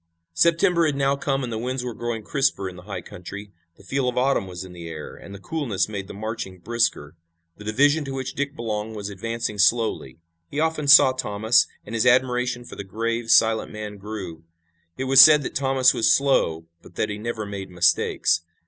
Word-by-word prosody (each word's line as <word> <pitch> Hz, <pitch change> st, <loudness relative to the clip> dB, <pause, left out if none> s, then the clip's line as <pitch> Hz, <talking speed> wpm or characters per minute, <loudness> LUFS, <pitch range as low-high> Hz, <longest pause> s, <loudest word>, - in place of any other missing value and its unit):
September 170 Hz, -, +3 dB
had 145 Hz, -, -1 dB
now 140 Hz, 0 st, +1 dB
come 140 Hz, -2 st, -2 dB
and 120 Hz, -2 st, -4 dB
the 110 Hz, -, -3 dB
winds 125 Hz, +2 st, -3 dB
were 125 Hz, -1 st, -4 dB
growing 115 Hz, 0 st, -4 dB
crisper 135 Hz, -5 st, 0 dB
in 90 Hz, -, -8 dB
the 90 Hz, -, -11 dB
high 100 Hz, -, -4 dB
country. 100 Hz, +3 st, -10 dB, 0.3 s
The -, -, -18 dB
feel 130 Hz, +5 st, -1 dB
of 125 Hz, -, -6 dB
autumn 130 Hz, -6 st, +1 dB
was 90 Hz, 0 st, -7 dB
in 95 Hz, -1 st, -11 dB
the 85 Hz, -1 st, -9 dB
air, 80 Hz, -2 st, -8 dB
and -, -, -13 dB
the 100 Hz, -, -8 dB
coolness 110 Hz, -, -2 dB
made 100 Hz, -3 st, -6 dB
the -, -, -9 dB
marching 110 Hz, -3 st, -6 dB
brisker. 95 Hz, -8 st, -1 dB, 0.4 s
The 105 Hz, -, -12 dB
division 145 Hz, +8 st, +2 dB
to 135 Hz, -, -5 dB
which 130 Hz, -1 st, -4 dB
Dick 140 Hz, +1 st, -3 dB
belonged 110 Hz, -1 st, -4 dB
was 105 Hz, -1 st, -6 dB
advancing 115 Hz, +1 st, -4 dB
slowly. 110 Hz, -, +1 dB, 0.3 s
He 145 Hz, -, -4 dB
often 160 Hz, -2 st, -1 dB
saw 140 Hz, -2 st, +8 dB
Thomas, 110 Hz, -2 st, +1 dB, 0.2 s
and 105 Hz, -, -9 dB
his 115 Hz, +2 st, +1 dB
admiration 125 Hz, -1 st, +1 dB
for -, -, -10 dB
the -, -, -6 dB
grave, 115 Hz, +4 st, -3 dB
silent 110 Hz, 0 st, +3 dB
man 105 Hz, -1 st, -7 dB
grew. 95 Hz, -6 st, -8 dB, 0.5 s
It 130 Hz, -, -3 dB
was 135 Hz, 0 st, +7 dB
said 150 Hz, 0 st, +8 dB
that -, -, -5 dB
Thomas 135 Hz, -1 st, +3 dB
was 115 Hz, -, +2 dB
slow, 85 Hz, -, +2 dB, 0.2 s
but -, -, -17 dB
that -, -, -1 dB
he 105 Hz, 0 st, -5 dB
never 110 Hz, -1 st, -4 dB
made 100 Hz, -2 st, -7 dB
mistakes. 85 Hz, -1 st, +1 dB
115 Hz, 205 wpm, -23 LUFS, 100-135 Hz, 0.5 s, saw